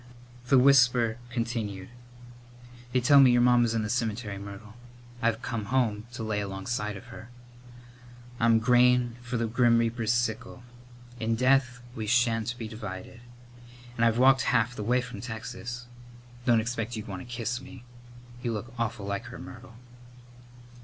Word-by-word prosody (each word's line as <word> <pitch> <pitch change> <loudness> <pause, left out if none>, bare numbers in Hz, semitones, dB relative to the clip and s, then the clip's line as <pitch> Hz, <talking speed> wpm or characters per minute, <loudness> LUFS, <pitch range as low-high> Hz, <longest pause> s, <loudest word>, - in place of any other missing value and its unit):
The 135 - +5
whisper 125 -3 +4
continued: 115 -6 -3 1.0
"They 125 - +2
tell 140 +3 +6
me 135 -2 +8
your 120 0 +4
mamma's 120 -2 +4
in 110 - 0
the - - -2
cem'tery, 110 -3 -2
Myrtle. 100 +2 -10 0.5
I've 115 +1 0
come 115 -4 -3
home 115 -3 0
to 120 -2 -5
lay 110 -1 -1
alongside 105 +2 -3
of 120 - -12
her. 115 +1 -11 1.1
I'm 115 -1 +4
grain 125 +1 +3
for 120 0 -4
the 115 - 0
grim 115 +1 +3
reaper's 115 -1 0
sickle. 120 +1 -2 0.6
In 115 0 0
death 125 0 +2
we 110 -3 -4
sha'n't 120 0 +1
be 115 -2 -5
divided; 110 0 -8 0.7
and 115 - 0
I've 115 0 +3
walked 130 +1 +5
half 125 0 +1
the - - -5
way 125 +4 +2
from 125 -5 -8
Texas. 120 +1 -6 0.6
Don't 115 -2 +5
expect 115 0 -3
you'd 110 0 -6
want 95 -3 -6
to - - -10
kiss 120 +1 -3
me. 135 -2 -12 0.6
You 120 -2 -2
look 115 +2 -6
awful 115 -3 -2
like 100 0 -3
her, - - -9
Myrtle." - - -11
115 Hz, 155 wpm, -28 LUFS, 110-125 Hz, 1.1 s, me